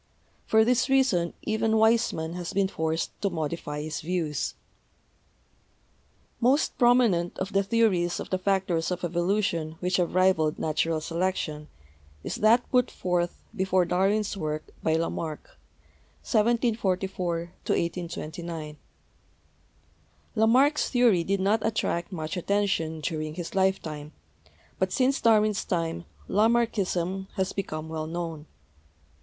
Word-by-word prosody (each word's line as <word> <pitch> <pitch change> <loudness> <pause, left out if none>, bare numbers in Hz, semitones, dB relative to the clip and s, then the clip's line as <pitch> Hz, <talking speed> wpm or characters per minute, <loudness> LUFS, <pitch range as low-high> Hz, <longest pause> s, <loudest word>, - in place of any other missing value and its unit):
For 220 0 +5
this 250 +2 +2
reason 245 -11 +2
even 220 0 0
Weismann 220 -7 +2
has 175 +1 -5
been 195 0 +2
forced 160 -3 -2
to 200 - +1
modify 155 -3 -4
his 155 0 -4
views. 160 -4 -2 1.8
Most 260 +5 +2
prominent 240 -9 +3
of 190 +1 -4
the 195 - +4
theories 195 -5 +1
of - - -7
the 185 - 0
factors 185 -4 0
of 180 -1 -3
evolu 175 +4 0
tion 160 -4 -2
which 180 0 0
have 175 -1 0
rivaled 185 -5 +3
natural 155 +1 0
selection 165 -3 -2 0.6
is - - -4
that 230 +3 +4
put 250 -1 +3
forth, 175 -1 -2
before 185 -1 +2
Darwin's 195 +4 +1
work, 155 -4 -4
by 160 - +1
Lamarck 165 -1 -3
(i - - -31 0.7
744 210 -6 +1 0.3
1 - - +2
829). 165 -2 -4 1.6
La 220 -1 +3
marck's 275 +6 +4
theory 235 -9 +4
did 195 +3 0
not 205 +4 +2
attract 210 -5 -1
much 160 -3 -4
attention 180 -4 0
during 155 -1 -3
his 175 -1 -6
lifetime, 160 -6 -1 0.7
but - - +1
since 265 +1 +1
Darwin's 215 -2 +3
time 165 - -2 0.2
Lamarckism 195 -4 +1
has 190 -2 -1
become 155 -5 -4
well 160 -1 -4
known. 165 -2 -5
185 Hz, 125 wpm, -27 LUFS, 165-215 Hz, 1.8 s, For